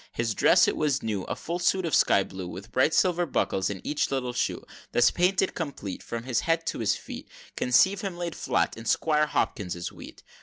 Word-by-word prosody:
XXIII. -, -, -26 dB
His 115 Hz, -2 st, -1 dB
dress -, -, +5 dB
it -, -, 0 dB
was 145 Hz, -2 st, 0 dB
new, 105 Hz, -4 st, -2 dB
A -, -, -3 dB
full 170 Hz, +2 st, -4 dB
suit 185 Hz, +1 st, +1 dB
of 160 Hz, -, -3 dB
sky 100 Hz, -, +4 dB
blue 95 Hz, -1 st, -7 dB
With 100 Hz, +5 st, -9 dB
bright 130 Hz, +6 st, +2 dB
silver 175 Hz, -2 st, +2 dB
buckles 95 Hz, -8 st, 0 dB
in 100 Hz, -2 st, -5 dB
each 150 Hz, -, 0 dB
little 125 Hz, -2 st, -2 dB
shoe -, -, -2 dB, 0.3 s
Thus 120 Hz, 0 st, +5 dB
painted 185 Hz, +2 st, +1 dB
complete, 140 Hz, -, -5 dB
From 115 Hz, 0 st, -5 dB
his 125 Hz, -1 st, 0 dB
head 165 Hz, 0 st, 0 dB
to -, -, -3 dB
his 105 Hz, -3 st, +1 dB
feet, -, -, -9 dB, 0.3 s
Conceive 190 Hz, +11 st, +3 dB
him 190 Hz, -4 st, -4 dB
laid 175 Hz, -1 st, -3 dB
flat -, -, 0 dB
in 115 Hz, -, -10 dB
Squire 150 Hz, +5 st, +2 dB
Hopkins's 90 Hz, -11 st, -2 dB
wheat. -, -, -12 dB
135 Hz, 215 wpm, -27 LUFS, 110-170 Hz, 0.3 s, dress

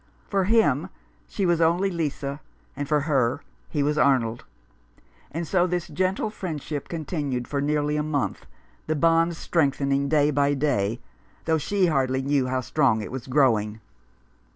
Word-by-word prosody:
For 195 Hz, -2 st, +1 dB
him 190 Hz, -, +3 dB, 0.4 s
she 200 Hz, -, -2 dB
was 170 Hz, -2 st, +2 dB
only 175 Hz, +4 st, +2 dB
Lisa, 145 Hz, -4 st, -3 dB, 0.3 s
and 145 Hz, 0 st, -4 dB
for 150 Hz, 0 st, +2 dB
her 135 Hz, -5 st, +1 dB, 0.3 s
he 145 Hz, -3 st, 0 dB
was 150 Hz, +1 st, +1 dB
Arnold. 120 Hz, -5 st, +2 dB, 0.8 s
And 165 Hz, +2 st, -4 dB
so 180 Hz, +1 st, +2 dB
this 175 Hz, -2 st, -2 dB
gentle 190 Hz, +3 st, -1 dB
friendship 155 Hz, -7 st, -5 dB
continued 145 Hz, -6 st, -3 dB
for 140 Hz, -1 st, -2 dB
nearly 150 Hz, +1 st, 0 dB
a -, -, +1 dB
month, 150 Hz, -2 st, -2 dB, 0.4 s
the 155 Hz, -, 0 dB
bond 165 Hz, +2 st, +3 dB
strengthening 140 Hz, -4 st, +1 dB
day 150 Hz, -1 st, +3 dB
by 145 Hz, 0 st, +2 dB
day, 120 Hz, -6 st, 0 dB, 0.4 s
though 160 Hz, -1 st, +2 dB
she 195 Hz, +5 st, +1 dB
hardly 135 Hz, -5 st, +1 dB
knew 140 Hz, -1 st, +1 dB
how 130 Hz, 0 st, -1 dB
strong 110 Hz, -2 st, +1 dB
it -, -, -7 dB
was 130 Hz, -1 st, -6 dB
growing. 115 Hz, -6 st, +2 dB
145 Hz, 155 wpm, -25 LUFS, 135-165 Hz, 0.8 s, him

